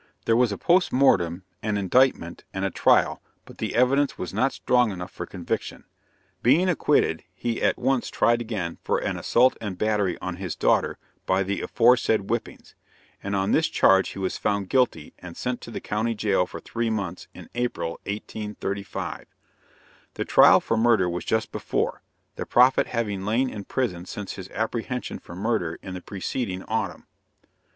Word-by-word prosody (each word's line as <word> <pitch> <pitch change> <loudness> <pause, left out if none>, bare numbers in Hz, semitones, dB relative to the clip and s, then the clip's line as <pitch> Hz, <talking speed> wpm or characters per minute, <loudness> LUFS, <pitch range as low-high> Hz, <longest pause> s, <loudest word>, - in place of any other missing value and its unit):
There 115 - +3
was 120 -2 +3
a 100 - -3
post 180 +1 +3
mortem, 90 -10 +3 0.2
an 105 -1 -1
indictment, 100 -3 +2
and 95 0 -1
a 95 - -1
trial, - - +3 0.2
but - - -15
the - - -3
evidence 135 +4 +3
was 90 - -5
not 130 +7 +2
strong 125 -2 +2
enough 90 -2 -6
for 90 - -7
conviction. 90 -3 -4 0.6
Being 160 +10 +4
acquitted, 145 - +2
he 120 +4 -2
was - - -6
at - - +2
once 130 -1 0
tried 120 0 +2
again 100 -8 -4
for - - +1
an - - -2
assault 125 +2 +3
and 100 -5 -4
battery 105 -3 0
on 90 -1 -5
his 95 -3 -4
daughter - - +2 0.3
by 95 +1 +2
the 100 +1 -2
aforesaid 115 -2 +3
whippings; 115 +4 -5 0.5
and 100 0 -3
on 95 0 0
this 160 - +3
charge 95 0 +4
he - - -9
was 95 -1 -2
found 100 -2 -1
guilty 125 - +1
and 85 -2 -10
sent 125 -1 -3
to - - -9
the - - -5
county 110 +2 -1
jail 100 -4 +1
for - - -8
three 115 0 -2
months, 100 -5 -3
in - - -11
April, 120 -8 -2 0.2
1835. 100 -1 -5 0.9
The - - -3
trial - - +7
for 115 - -1
murder 110 -5 +4
was 90 0 -3
just 110 0 0
before - - -2 0.4
the - - -5
prophet 125 +2 +4
having 105 -5 -2
lain 120 +6 +1
in 100 -2 -7
prison 90 -9 -2
since 105 -2 -6
his 95 -1 -9
apprehension 115 +2 -3
for 85 - -11
murder 95 -5 -1
in 95 - -6
the 90 - -6
preceding 95 +1 -4
autumn. 110 +1 -3
105 Hz, 175 wpm, -25 LUFS, 95-120 Hz, 0.9 s, trial